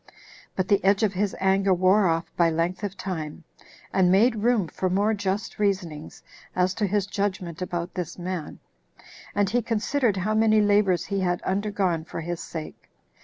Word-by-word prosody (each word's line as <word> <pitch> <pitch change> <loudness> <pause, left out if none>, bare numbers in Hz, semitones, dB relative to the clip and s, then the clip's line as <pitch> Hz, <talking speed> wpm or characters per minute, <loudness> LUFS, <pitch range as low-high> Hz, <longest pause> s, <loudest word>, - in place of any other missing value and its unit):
But 185 -1 -1
the 200 0 +2
edge 195 +2 +3
of 205 -2 +2
his 200 +1 -1
anger 190 0 +3
wore 185 +2 +4
off 165 0 -1
by 170 -1 +4
length 170 +5 -1
of 200 -1 -4
time, 170 -5 -5 0.5
and 185 -2 +4
made 225 +5 +4
room 220 -3 +2
for 185 +3 -2
more 205 +4 +2
just 205 +2 -3
reasonings 180 -7 -2 0.3
as 185 0 +2
to 205 +1 -1
his 205 0 0
judgment 190 -4 -3
about 175 -1 -3
this 180 -3 -5
man; 180 -3 -5 0.8
and 205 -1 +2
he 240 +5 +1
considered 230 0 0
how 205 +4 0
many 215 0 +4
labors 205 -3 +3
he 200 0 -2
had 175 -2 0
undergone 190 -4 0
for 165 - -6
his 170 +1 -4
sake. 160 -1 -8
190 Hz, 170 wpm, -25 LUFS, 175-205 Hz, 0.8 s, wore